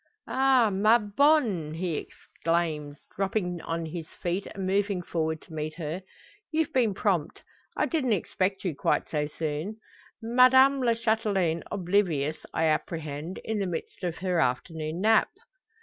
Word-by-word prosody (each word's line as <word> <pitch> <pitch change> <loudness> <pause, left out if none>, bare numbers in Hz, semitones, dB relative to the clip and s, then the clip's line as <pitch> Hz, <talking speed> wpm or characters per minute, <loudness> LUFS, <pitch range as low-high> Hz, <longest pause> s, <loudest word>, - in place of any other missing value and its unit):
"Ah! 260 -4 +3
ma 215 +4 +5
bonne!" 210 - +2
he 170 -1 -2
exclaims, 155 -3 -3
dropping 190 -3 -1
on 165 0 -3
his 160 0 -6
feet, 180 +3 -3
and 195 -1 -5
moving 200 0 +1
forward 160 -2 -2
to 165 - -14
meet 155 0 -4
her. 165 +2 -4 0.5
"You've 315 -1 0
been 230 -6 +2
prompt! 185 -7 -1 0.3
I - - +3
didn't 265 -9 +1
expect 195 0 -1
you 180 - 0
quite - - +1
so 150 -1 -1
soon. 155 +7 -4 0.4
Madame 260 +4 +5
la 235 -2 +3
Chatelaine 210 -7 +1
oblivious, 175 -6 0
I 160 - 0
apprehend; 155 +1 -2
in 220 -1 -1
the 195 - -1
midst 170 +2 -6
of 175 -2 -2
her 180 -2 0
afternoon 155 +5 -1
nap?" 220 +1 +4
180 Hz, 145 wpm, -27 LUFS, 160-220 Hz, 0.5 s, ma